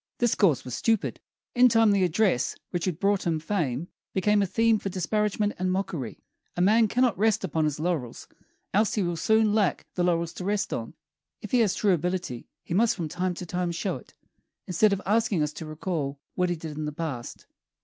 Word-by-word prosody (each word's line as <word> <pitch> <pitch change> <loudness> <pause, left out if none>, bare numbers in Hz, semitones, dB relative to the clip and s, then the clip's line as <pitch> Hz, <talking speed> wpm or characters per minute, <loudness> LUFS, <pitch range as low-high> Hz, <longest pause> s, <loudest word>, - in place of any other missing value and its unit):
This 240 -2 +2
course 145 - +2
was 125 - -6
stupid; 225 - 0 0.3
in 250 0 +6
time 225 -2 +4
the 200 -2 +3
address 175 - +1 0.2
which 175 -2 -2
had 180 -3 -2
brought 200 -2 +1
him 160 -2 +1
fame 160 -4 -2 0.3
became 205 +2 +3
a 200 - +1
theme 225 +2 +3
for 195 - -4
disparagement 210 +3 0
and 185 0 0
mockery. 175 - -3 0.3
A - - -1
man 220 +4 +5
cannot 245 0 +2
rest 220 -1 +2
upon 160 -3 0
his 150 -1 -2
laurels, 155 -8 -3 0.5
else 210 +2 +2
he 210 - +1
will 175 -1 -1
soon 220 +4 +3
lack 210 -4 +1
the 180 - 0
laurels 170 -1 +1
to 180 - -7
rest 205 +1 -1
on. - - -5 0.5
If - - -7
he 250 - +4
has 215 -5 +3
true 205 -3 +3
ability, 175 -7 -2 0.2
he - - -5
must 220 +5 +3
from 165 -5 -4
time 180 +2 -2
to 180 - -6
time 175 0 -2
show 180 +3 -2
it, - - -17 0.5
instead 200 +3 +3
of 200 0 -1
asking 210 -5 +2
us 150 0 -2
to 155 +1 -7
recall 155 -3 -3
what 180 -1 0
he 175 - 0
did 155 -2 -7
in 155 - -3
the 150 - -3
past. 145 -6 -6
185 Hz, 210 wpm, -27 LUFS, 160-210 Hz, 0.5 s, in